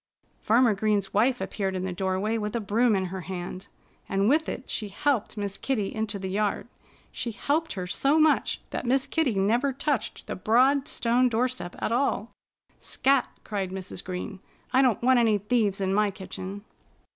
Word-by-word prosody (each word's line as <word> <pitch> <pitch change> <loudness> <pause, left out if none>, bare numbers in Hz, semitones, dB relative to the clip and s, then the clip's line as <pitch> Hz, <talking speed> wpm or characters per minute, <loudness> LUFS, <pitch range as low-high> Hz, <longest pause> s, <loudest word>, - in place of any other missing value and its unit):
Farmer 230 +1 +4
Green's 205 -1 0
wife 245 +5 +3
appeared 195 -2 -2
in 185 - -2
the 185 - -3
doorway 190 +4 -1
with 210 +1 -3
a - - +1
broom 220 +2 +2
in 190 -1 0
her 190 - -4
hand. 180 +1 -6 0.4
And 195 +1 +1
with 310 +6 +3
it 260 - -6
she 210 -2 -3
helped 230 0 -1
Miss 200 -1 -3
Kitty 215 -8 -1
into 220 -1 -2
the 190 -1 -5
yard. 205 +1 -1 0.4
She 240 - -4
helped 310 +8 -1
her 185 -3 -4
so 275 - +2
much 310 -1 +3
that - - -3
Miss 265 +2 +3
Kitty 305 -9 0
never 235 +8 +2
touched 265 -4 -2
the - - -4
broad 260 +8 +3
stone 245 +2 +2
doorstep 235 -6 -1
at - - -2
all. 235 -3 0 0.5
"Scat!" 275 -1 +2 0.2
cried 200 -3 -3
Mrs. 185 -1 -6
Green. 185 +2 -5 0.3
"I 260 - +6
don't 245 -4 +2
want 255 0 +5
any 225 -3 +4
thieves 205 -1 +1
in 190 -1 0
my 210 +1 +3
kitchen." 195 +1 -7
215 Hz, 180 wpm, -27 LUFS, 195-255 Hz, 0.5 s, I